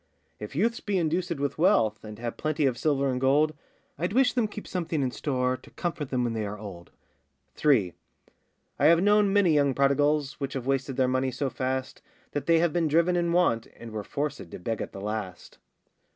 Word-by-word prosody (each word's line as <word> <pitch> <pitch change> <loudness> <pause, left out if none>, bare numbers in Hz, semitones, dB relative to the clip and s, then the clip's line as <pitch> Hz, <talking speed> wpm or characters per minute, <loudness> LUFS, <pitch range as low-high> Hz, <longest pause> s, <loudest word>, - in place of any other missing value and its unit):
If 105 +5 -8
youths 230 +8 +1
be 205 -2 -3
inducèd 170 0 0
with 140 +1 -3
wealth, 115 - +3
And 105 -1 -9
have 115 +1 -4
plenty 155 -1 -1
of 130 -3 +2
silver 140 +1 +1
and 125 0 -2
gold, 145 +4 +3 0.5
I'd 175 +4 -1
wish 255 +1 +4
them 240 -4 +1
keep 210 0 -8
something 165 -5 -2
in 130 - -1
store, 125 0 -1
To - - -17
comfort 165 -5 -4
them 125 -2 0
when 120 -1 -1
they 110 -1 -2
are 105 0 -5
old. 95 -5 -9 0.6
3. 110 - +2 0.9
I - - +3
have 170 +2 +5
known 205 0 +4
many 195 -5 +4
young 140 -3 +3
prodigals, 140 +1 +2
Which 140 -1 -3
have 130 -3 -4
wasted 135 -1 -1
their 130 -1 +3
money 130 +1 +1
so 135 +1 -2
fast, 130 0 -3 0.3
That 145 -1 -4
they 165 -1 +5
have 165 -1 +2
been 170 -2 +1
driven 170 +4 +3
in 170 -1 +1
want, 170 -10 +2
And 115 -1 -9
were 110 -1 -4
forcèd 140 - -4
to - - -8
beg 110 +5 -3
at - - -5
the 95 - -8
last. 105 -4 -5
140 Hz, 210 wpm, -27 LUFS, 125-170 Hz, 0.9 s, have